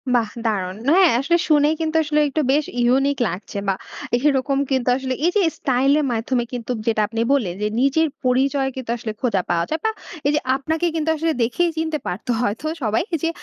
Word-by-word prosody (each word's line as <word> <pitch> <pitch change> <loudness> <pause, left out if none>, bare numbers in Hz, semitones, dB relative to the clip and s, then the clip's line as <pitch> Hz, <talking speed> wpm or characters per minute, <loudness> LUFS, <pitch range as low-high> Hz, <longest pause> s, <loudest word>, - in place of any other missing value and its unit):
বাহ! 225 -3 +1 0.2
দারুন। 190 -3 -1 0.2
হ্যাঁ, 370 -2 +6
আসলে 340 +6 +2
শুনে 295 -1 +5
কিন্তু 320 0 -2
আসলে 300 0 +1
একটু 310 +3 0
বেশ 295 +2 +3 0.2
ইউনিক 270 +3 +2
লাগছে 190 +3 -6
বা 195 - +3 0.4
এইরকম 275 0 +1
কিন্তু 255 -2 +1
আসলে 265 -1 -3
এই 350 - +3
যে, 410 - +4 0.2
স্টাইল 265 +1 +2
এর 295 - 0
মাধ্যমে 240 +2 0
কিন্তু 245 0 -4 0.2
যেটা 220 -1 +2
আপনি 225 0 -3
বললেন 200 -11 0
যে, 210 - +1
নিজের 315 +4 +3 0.2
পরিচয় 265 +2 +2
কিন্তু 260 -3 -7
আসলে 225 -1 -5
খোঁজা 220 -7 +1
পাওয়া 170 -1 +1
যায়। 315 +1 -1
বা 440 - +3 0.4
এই - - +3
যে - - +3 0.2
আপনাকে 320 +5 -1
কিন্তু 320 0 0
আসলে 325 +1 0
দেখেই 340 +9 +1
চিনতে 320 -1 -1
পারতো 215 +7 -3
হয়তো 225 +6 -2 0.2
সবাই 220 +3 +1 0.2
যে 330 - +2
265 Hz, 195 wpm, -21 LUFS, 230-305 Hz, 0.4 s, হ্যাঁ